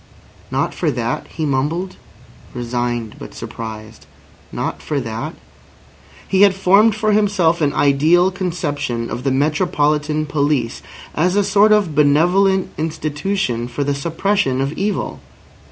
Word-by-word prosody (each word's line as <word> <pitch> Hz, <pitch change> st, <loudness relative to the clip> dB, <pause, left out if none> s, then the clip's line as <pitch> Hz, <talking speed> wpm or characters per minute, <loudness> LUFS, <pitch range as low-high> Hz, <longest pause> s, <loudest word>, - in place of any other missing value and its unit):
"Not -, -, -1 dB
for 165 Hz, -, -1 dB
that?" 120 Hz, -3 st, -2 dB
he 160 Hz, -, -4 dB
mumbled, 150 Hz, +7 st, -1 dB, 0.6 s
resigned 120 Hz, -2 st, -3 dB
but -, -, -10 dB
surprised. 110 Hz, -1 st, -8 dB, 0.4 s
"Not -, -, -4 dB
for 150 Hz, -2 st, -2 dB
that?" 115 Hz, -2 st, -5 dB, 0.9 s
He 190 Hz, -, +2 dB
had 200 Hz, -2 st, +6 dB
formed 200 Hz, +3 st, +4 dB
for 215 Hz, 0 st, +1 dB
himself 195 Hz, -5 st, +2 dB
an 145 Hz, -2 st, +2 dB
ideal 160 Hz, +6 st, +3 dB
conception 145 Hz, -10 st, -3 dB
of 125 Hz, -, -4 dB
the 135 Hz, -, +1 dB
metropolitan 150 Hz, +1 st, +1 dB
police 145 Hz, -5 st, -1 dB, 0.3 s
as 180 Hz, +4 st, +1 dB
a 205 Hz, -, +3 dB
sort 200 Hz, +2 st, +4 dB
of 205 Hz, -7 st, +3 dB
benevolent 175 Hz, +7 st, +3 dB
institution 155 Hz, -4 st, -2 dB
for 125 Hz, +4 st, -3 dB
the 140 Hz, 0 st, 0 dB
suppression 165 Hz, -1 st, 0 dB
of 135 Hz, +2 st, -1 dB
evil. 200 Hz, +4 st, -2 dB
150 Hz, 130 wpm, -19 LUFS, 135-190 Hz, 0.9 s, had